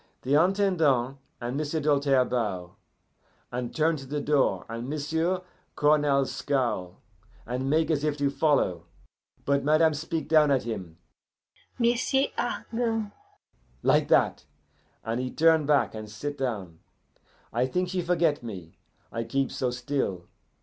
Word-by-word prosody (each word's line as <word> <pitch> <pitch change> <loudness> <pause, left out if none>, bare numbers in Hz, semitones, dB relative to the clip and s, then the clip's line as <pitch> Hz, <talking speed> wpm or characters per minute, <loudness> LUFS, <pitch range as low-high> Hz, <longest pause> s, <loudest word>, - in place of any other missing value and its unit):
The 135 - 0
Intendant 160 -7 +2 0.2
and 120 +2 -3
M'sieu' 155 +1 -1
Doltaire 140 -3 +3
bow, 100 -8 -3 0.8
and 125 -1 -3
turn 160 0 +2
to 135 -1 -10
the 145 +2 -2
door, 145 -1 +1
and 115 +3 -5
M'sieu' 160 +5 -1 0.3
Cournal 145 -2 +3
scowl, 120 -12 -2 0.5
and 125 +2 -2
make 160 +2 +2
as 150 -2 0
if 150 -1 0
to 140 -1 +1
follow; 135 - +1 0.6
but 140 0 +2
madame 155 +2 +4
speak 160 +2 -3
down 155 -2 +5
at 135 -2 +2
him, 95 -8 -6 0.8
'M'sieu' 250 +3 +2
Argand' 225 -3 -2 0.7
like - - +3
that! - - +2 0.6
and 115 +2 -2
he 130 0 -2
turn 160 0 +3
back, 145 -2 +3
and 110 -1 -7
sit 145 +8 -5
down. 100 - -4 0.7
I 125 +3 +1
think 180 +6 -1
she 185 0 -1
forget 170 -4 +1
me, 95 -9 -9 0.3
I 115 - -3
keep 135 +3 -1
so 130 - -1
still. 120 -8 -2
140 Hz, 135 wpm, -27 LUFS, 120-160 Hz, 0.8 s, down